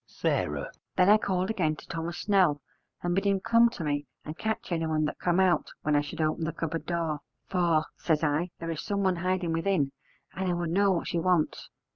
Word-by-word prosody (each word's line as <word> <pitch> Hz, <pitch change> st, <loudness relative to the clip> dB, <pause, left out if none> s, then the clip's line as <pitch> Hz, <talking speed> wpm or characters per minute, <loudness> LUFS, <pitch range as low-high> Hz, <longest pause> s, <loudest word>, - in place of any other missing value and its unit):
S. -, -, -21 dB
Then 185 Hz, +1 st, 0 dB
I 215 Hz, +1 st, +7 dB
called 190 Hz, 0 st, 0 dB
again 160 Hz, -8 st, 0 dB
to -, -, -14 dB
Thomas 165 Hz, +1 st, -4 dB
Snell, 185 Hz, -8 st, +3 dB, 0.4 s
and 175 Hz, 0 st, 0 dB
bid 195 Hz, -, +1 dB
him 200 Hz, -1 st, +3 dB
come 230 Hz, +3 st, +5 dB
to 180 Hz, -, -6 dB
me 145 Hz, -1 st, -1 dB, 0.2 s
and 155 Hz, -, -6 dB
catch 220 Hz, 0 st, -3 dB
anyone 160 Hz, -2 st, +1 dB
that 150 Hz, -, -4 dB
come 175 Hz, +1 st, +2 dB
out 185 Hz, -2 st, +3 dB
when 150 Hz, -1 st, +2 dB
I 145 Hz, -, +4 dB
should 145 Hz, -, -7 dB
open 155 Hz, +1 st, 0 dB
the 160 Hz, -, -1 dB
cupboard 165 Hz, 0 st, -4 dB
door, 165 Hz, -3 st, -1 dB, 0.3 s
'for,' 170 Hz, -4 st, +2 dB
says 160 Hz, -2 st, 0 dB
I, 155 Hz, +4 st, +1 dB
'there 165 Hz, 0 st, -4 dB
is 160 Hz, -, -4 dB
someone 195 Hz, -3 st, 0 dB
hiding 180 Hz, -1 st, 0 dB
within, 165 Hz, -4 st, +1 dB, 0.4 s
and 190 Hz, -1 st, -2 dB
I -, -, +2 dB
would 175 Hz, -1 st, -2 dB
know 200 Hz, +2 st, +4 dB
what 175 Hz, -, -1 dB
she 170 Hz, -, 0 dB
wants.' 175 Hz, -2 st, +1 dB
170 Hz, 210 wpm, -28 LUFS, 160-190 Hz, 0.4 s, I